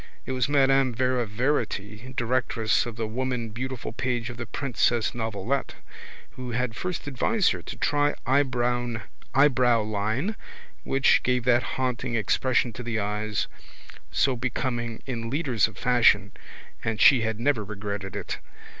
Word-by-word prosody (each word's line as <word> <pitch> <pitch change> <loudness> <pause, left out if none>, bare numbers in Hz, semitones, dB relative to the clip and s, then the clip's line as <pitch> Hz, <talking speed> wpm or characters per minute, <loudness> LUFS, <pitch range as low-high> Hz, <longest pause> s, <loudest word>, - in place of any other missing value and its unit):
It - - -4
was 130 +1 0
Madame 135 -3 +3
Vera 125 -1 +1
Verity, 110 -1 -2
directress 120 -2 +1
of 120 - -6
the 115 0 -2
Woman 125 +1 -2
Beautiful 130 +3 -5
page 120 -1 -2
of 120 - -10
the 120 -2 -5
Princess 120 -3 0
Novelette, 115 +3 -2 0.6
who 130 -1 -7
had 120 -1 -1
first 180 +5 -4
advised 175 - +2
her - - -3
to - - -7
try 145 0 +2
eyebrowleine 120 - +1 0.5
which 135 0 +4
gave 125 -1 +1
that 120 0 +4 0.2
haunting 125 -2 -1
expression 120 +2 +1
to 125 - -7
the 120 -1 -2
eyes, 105 -4 -1 0.7
so 135 -2 +2
becoming 120 -1 -3
in 115 -3 -4
leaders 130 -7 +1
of 110 - -13
fashion, 110 -5 +4 0.5
and 110 -1 -1
she 130 -4 +7
had 110 -1 -2
never 125 -3 +1
regretted 100 -2 -5
it. - - -4
120 Hz, 135 wpm, -26 LUFS, 110-130 Hz, 0.7 s, she